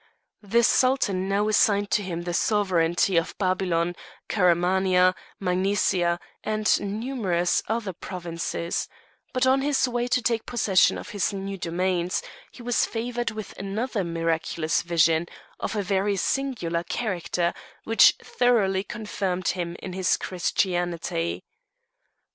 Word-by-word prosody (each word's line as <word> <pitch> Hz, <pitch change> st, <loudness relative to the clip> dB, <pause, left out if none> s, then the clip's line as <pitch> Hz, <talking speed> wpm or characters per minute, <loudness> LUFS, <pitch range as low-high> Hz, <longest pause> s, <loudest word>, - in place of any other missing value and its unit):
The 230 Hz, +3 st, +2 dB
Sultan 215 Hz, -8 st, +2 dB
now 205 Hz, +2 st, +1 dB
assigned 205 Hz, -1 st, +3 dB
to -, -, +3 dB
him 175 Hz, -3 st, -4 dB
the 175 Hz, 0 st, -3 dB
sovereignty 180 Hz, -3 st, +2 dB
of 165 Hz, -, -1 dB
Babylon, 180 Hz, -3 st, 0 dB, 0.3 s
Caramania, 180 Hz, 0 st, +3 dB, 0.3 s
Magnesia, 180 Hz, -2 st, +1 dB, 0.2 s
and 215 Hz, 0 st, +2 dB, 0.2 s
numerous 200 Hz, -9 st, 0 dB
other 220 Hz, -3 st, -2 dB
provinces; 170 Hz, -1 st, -4 dB, 0.4 s
but 255 Hz, 0 st, +1 dB
on 265 Hz, +1 st, +4 dB
his 275 Hz, -2 st, +2 dB
way 240 Hz, 0 st, -1 dB
to 250 Hz, -, +2 dB
take 230 Hz, -1 st, -1 dB
possession 205 Hz, -6 st, +3 dB
of -, -, -8 dB
his 205 Hz, -1 st, -1 dB
new 195 Hz, 0 st, -4 dB
domains 180 Hz, 0 st, -1 dB, 0.3 s
he 245 Hz, -, -12 dB
was 245 Hz, 0 st, +1 dB
favoured 240 Hz, +1 st, -2 dB
with 215 Hz, -2 st, -7 dB
another 200 Hz, +2 st, -2 dB
miraculous 165 Hz, -1 st, -1 dB
vision, 170 Hz, -1 st, +2 dB, 0.3 s
of -, -, -3 dB
a 205 Hz, -, 0 dB
very 195 Hz, +1 st, +1 dB
singular 190 Hz, -8 st, -1 dB
character, 175 Hz, -4 st, -1 dB, 0.3 s
which 225 Hz, 0 st, +6 dB
thoroughly 205 Hz, -6 st, +2 dB
confirmed 195 Hz, -5 st, -3 dB
him 175 Hz, -2 st, -3 dB
in 185 Hz, -, -5 dB
his 185 Hz, -1 st, +1 dB
Christianity. 175 Hz, -, -1 dB
190 Hz, 125 wpm, -25 LUFS, 175-215 Hz, 0.4 s, which